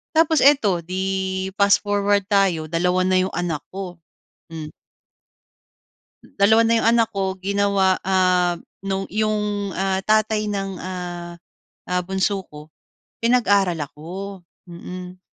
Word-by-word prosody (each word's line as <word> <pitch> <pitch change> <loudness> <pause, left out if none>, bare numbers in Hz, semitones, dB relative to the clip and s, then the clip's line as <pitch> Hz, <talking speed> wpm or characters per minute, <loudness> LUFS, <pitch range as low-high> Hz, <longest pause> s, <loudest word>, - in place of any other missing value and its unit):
tapos 320 -2 +4
eto, 220 -11 +4
‘di, 190 +1 -2
fast 200 0 +5
forward 205 -1 +1
tayo, 190 -6 +2
2 180 +2 +1
na 185 0 +2
yung 185 +1 -1
anak 170 -4 -2
ko. 185 -2 -6 0.6
Hmm. 155 -2 -7 1.7
Dalawa 220 +3 +5
na 230 - +4
yung 225 - +2
anak 230 -2 +3
ko, 190 -1 0
ginawa, 200 -1 +2
ah, 180 -2 +2 0.2
nung 195 0 -2
'yong, 210 -2 -1
ah, 190 0 -1
tatay 215 0 +2
ng, 195 -2 -3
ah, 175 -1 -6 0.6
ah, 180 0 0
bunso 190 +1 -1
ko, 150 -1 -13 0.5
pinag-aral 205 -6 +3
ako, 185 +7 -8 0.2
mm. 180 +1 -9
190 Hz, 120 wpm, -22 LUFS, 180-205 Hz, 1.7 s, fast